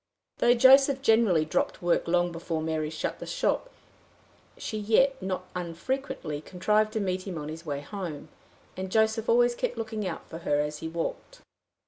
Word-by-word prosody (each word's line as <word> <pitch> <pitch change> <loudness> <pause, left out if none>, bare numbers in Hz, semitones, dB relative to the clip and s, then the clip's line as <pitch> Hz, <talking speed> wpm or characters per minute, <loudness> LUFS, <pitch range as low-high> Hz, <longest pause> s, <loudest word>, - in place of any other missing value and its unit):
Though 240 +1 +5
Joseph 270 +2 +6
generally 220 - +4
dropped 155 - -1
work 175 -1 +1
long 175 0 +2
before 165 -1 -3
Mary 155 -1 -2
shut 155 - -4
the - - -7
shop, - - 0 0.9
she 215 - -4
yet 265 +5 +3
not 185 -1 -3
unfrequently 175 - -4
contrived 210 +6 +1
to 220 - 0
meet 185 -1 -2
him 180 -3 -4
on 150 0 -5
his 165 +1 -8
way 140 -1 -2
home; 175 -4 -6 0.5
and 185 0 -5
Joseph 220 +1 +2
always 240 +1 +4
kept 240 - -3
looking 220 -3 -3
out 170 - -6
for 165 - -8
her 145 -3 0
as 150 0 -2
he 160 - -5
walked. 170 - -5
185 Hz, 170 wpm, -28 LUFS, 165-225 Hz, 0.9 s, Joseph